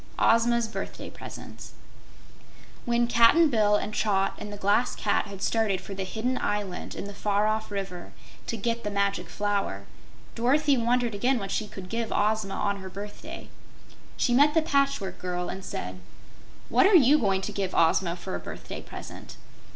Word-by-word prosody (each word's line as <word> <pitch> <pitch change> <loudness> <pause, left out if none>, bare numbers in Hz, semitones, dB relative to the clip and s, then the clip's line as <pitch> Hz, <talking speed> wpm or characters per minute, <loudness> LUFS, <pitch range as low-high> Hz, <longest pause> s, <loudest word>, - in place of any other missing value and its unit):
6. - - -23
Ozma's 235 0 +3
Birthday 220 - -6
Presents - - -10 1.1
When 240 0 +2
Cap'n 235 +7 +5
Bill 210 -3 +4
and 210 +1 -2
Trot 195 -3 +1
and 210 - -7
the 205 - -7
Glass 205 +5 +2
Cat - - +1
had 195 -1 -8
started 220 -5 +1
for 195 - -8
the 195 0 -3
hidden 230 +7 -2
island 205 -3 -3
in - - -5
the 205 - -7
far 205 +1 +1
off 220 0 0
river 195 -3 -5 0.4
to 230 - -2
get 230 +2 -2
the 210 - -2
Magic 200 -1 -1
Flower, 200 - -1 0.5
Dorothy 280 +5 +3
wondered 240 -1 +1
again 250 +6 +1
what 195 -3 -4
she 215 - -1
could 190 -2 -9
give 230 +3 -3
Ozma 210 -1 +1
on 200 -1 0
her 190 -1 -8
birthday. 205 +2 -8 0.7
She 245 - +2
met 290 +5 +5
the 320 - +4
Patchwork 275 - 0
Girl 180 -1 -3
and 190 - -6
said: 90 - -5 0.7
"What 385 - +5
are 405 - +5
you 295 -1 +6
going 195 -5 +1
to 200 - -4
give 195 -2 -3
Ozma 170 +1 +3
for 175 - -7
a 90 - -2
birthday - - -7
present?" - - -10
210 Hz, 175 wpm, -27 LUFS, 195-235 Hz, 1.1 s, you